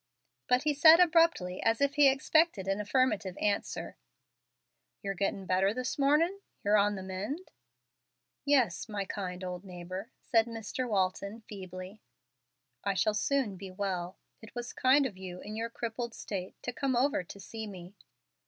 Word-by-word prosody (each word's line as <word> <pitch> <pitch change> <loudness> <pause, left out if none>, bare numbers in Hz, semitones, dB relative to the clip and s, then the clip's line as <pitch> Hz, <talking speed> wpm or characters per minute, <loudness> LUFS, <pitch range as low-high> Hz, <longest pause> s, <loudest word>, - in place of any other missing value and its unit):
But 250 +2 +3
he 300 -1 +2
said 315 +3 +8
abruptly, 330 - +3
as 225 0 +2
if 280 0 +2
he 285 -1 +6
expected 275 - +2
an 195 +1 0
affirmative 210 -4 +1
answer, 205 -1 -2 1.1
"Yer 195 0 -1
gettin' 195 0 -2
better 190 +3 +2
this 255 +2 -3
mornin' 310 +8 +3 0.3
yer 205 +1 +4
on 205 0 +3
the 190 - -6
mend?" 205 - -5 0.9
"Yes, 255 -9 +2
my 205 -2 -2
kind 185 -2 -5
old 180 0 -5
neighbor," 185 +3 -7
said 225 -2 +3
Mr. 230 +2 -4
Walton, 200 +2 -1
feebly. 190 -1 -9 0.8
"I 200 - 0
shall 215 +2 +2
soon 215 -2 0
be 190 +1 -8
well. 185 -2 -3 0.2
It 220 +1 -13
was 240 0 -5
kind 270 +2 +4
of 200 -8 -5
you, 180 -1 -7
in 210 +1 -7
your 230 +1 -2
crippled 235 0 -4
state, 190 -3 -5
to 245 - -3
come 270 0 0
over 260 -4 +2
to 190 +3 -11
see 220 +3 -7
me." 185 -2 -10
210 Hz, 160 wpm, -31 LUFS, 190-255 Hz, 1.1 s, said